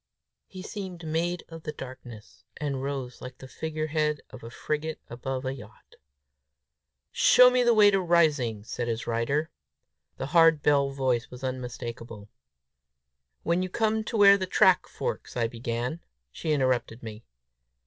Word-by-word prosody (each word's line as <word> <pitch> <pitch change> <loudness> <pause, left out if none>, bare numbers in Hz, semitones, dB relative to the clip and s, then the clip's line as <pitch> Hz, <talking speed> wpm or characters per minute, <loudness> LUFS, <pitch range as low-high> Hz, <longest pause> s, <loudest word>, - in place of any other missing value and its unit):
He 185 -1 -10
seemed 190 -5 -7
made 170 +3 -1
of 165 0 -10
the 150 - -5
darkness, 125 -6 -11
and 140 -3 -3
rose 135 -3 -5
like 125 0 -9
the 130 - -11
figurehead 155 0 -2
of 130 - -11
a 115 - -7
frigate 150 +5 -4
above 130 +2 -4
a 130 - -2
yacht. 110 -5 -14 1.1
"Show 250 0 +6
me 250 0 +3
the 240 -1 +4
way 205 -1 +7
to 195 -1 +2
Rising," 150 - +2
said 120 +2 -4
his 115 0 -3
rider. 130 +7 -1 0.7
The - - -4
hard 165 -3 +5
bell 140 -1 +3
voice 130 -3 -1
was 125 +1 -11
unmistakable. 120 -4 -6 1.1
"When 170 +2 +1
you 185 - -2
come 220 +2 0
where 200 -2 +6
the 185 - -2
track 190 -1 +4
forks," - - -5
I 120 - +1
began. 120 +5 -4 0.3
She 155 - -3
interrupted 130 -5 0
me. 110 0 -8
140 Hz, 150 wpm, -27 LUFS, 120-170 Hz, 1.1 s, way